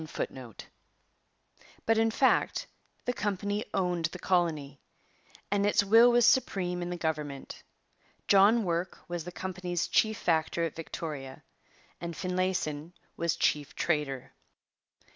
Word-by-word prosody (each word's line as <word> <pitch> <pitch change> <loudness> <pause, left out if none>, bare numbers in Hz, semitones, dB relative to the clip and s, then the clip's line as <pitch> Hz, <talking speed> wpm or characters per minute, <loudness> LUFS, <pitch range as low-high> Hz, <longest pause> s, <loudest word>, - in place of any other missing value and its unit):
But, 225 0 +3
in 225 0 +3
fact, 260 +4 +2 0.4
the 245 - 0
company 205 0 -2
owned 180 -3 0
the 170 +3 -3
colony, 160 -7 0 0.7
and 200 0 +2
its 205 +1 +3
will 225 +4 +7
was 240 -1 +5
supreme 180 -9 +2
in 175 - -3
the 180 - -3
government. 150 -4 -4 0.7
John 205 +4 +6
Work 175 0 -2
was 175 -2 -4
the 180 - -6
company's 180 -2 -3
chief 220 -1 +2
factor 165 0 +1
at 165 - -2
Victoria 150 -5 -6 0.6
and 170 -1 -5
Finlayson 180 -4 -2 0.2
was 170 -1 0
chief 145 -2 0
trader. 135 -5 -1
175 Hz, 120 wpm, -29 LUFS, 160-200 Hz, 0.7 s, will